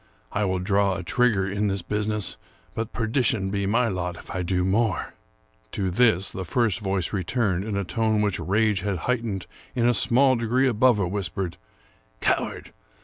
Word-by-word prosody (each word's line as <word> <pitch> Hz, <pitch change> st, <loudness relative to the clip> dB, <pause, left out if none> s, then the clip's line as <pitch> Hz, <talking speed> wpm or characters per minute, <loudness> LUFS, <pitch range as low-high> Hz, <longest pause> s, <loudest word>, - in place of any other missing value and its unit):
I 105 Hz, +1 st, 0 dB
will 95 Hz, -1 st, 0 dB
draw 100 Hz, +1 st, +1 dB
a 90 Hz, -, -5 dB
trigger 105 Hz, -1 st, +2 dB
in 100 Hz, +2 st, 0 dB
this 95 Hz, -2 st, -2 dB
busi 105 Hz, +2 st, -2 dB
ness; 105 Hz, -3 st, -2 dB, 0.4 s
but 115 Hz, -1 st, -3 dB
perdition 110 Hz, -4 st, 0 dB
be 100 Hz, -1 st, -1 dB
my 115 Hz, +4 st, +2 dB
lot 90 Hz, -4 st, -3 dB
if -, -, -11 dB
I 95 Hz, -, -2 dB
do 90 Hz, 0 st, 0 dB
more! 105 Hz, -1 st, 0 dB, 0.3 s
" -, -, -38 dB
To 95 Hz, -2 st, -1 dB
this 105 Hz, -2 st, +3 dB
the 95 Hz, -, -5 dB
first 115 Hz, +2 st, 0 dB
voice 95 Hz, -4 st, -2 dB
returned, 100 Hz, -1 st, 0 dB
in 105 Hz, -2 st, -2 dB
a 100 Hz, -, 0 dB
tone 110 Hz, +3 st, +1 dB
which 100 Hz, -3 st, 0 dB
rage 105 Hz, +1 st, +1 dB
had 100 Hz, -1 st, -1 dB
heightened 115 Hz, -7 st, -1 dB, 0.3 s
in 120 Hz, -, +2 dB
a 120 Hz, -, +4 dB
small 130 Hz, +3 st, +4 dB
degree 120 Hz, +3 st, +1 dB
above 125 Hz, 0 st, +4 dB
a 100 Hz, -3 st, 0 dB
whisper, 95 Hz, -1 st, -3 dB, 0.4 s
" -, -, -35 dB
Coward! -, -, -1 dB
100 Hz, 190 wpm, -25 LUFS, 95-115 Hz, 0.4 s, a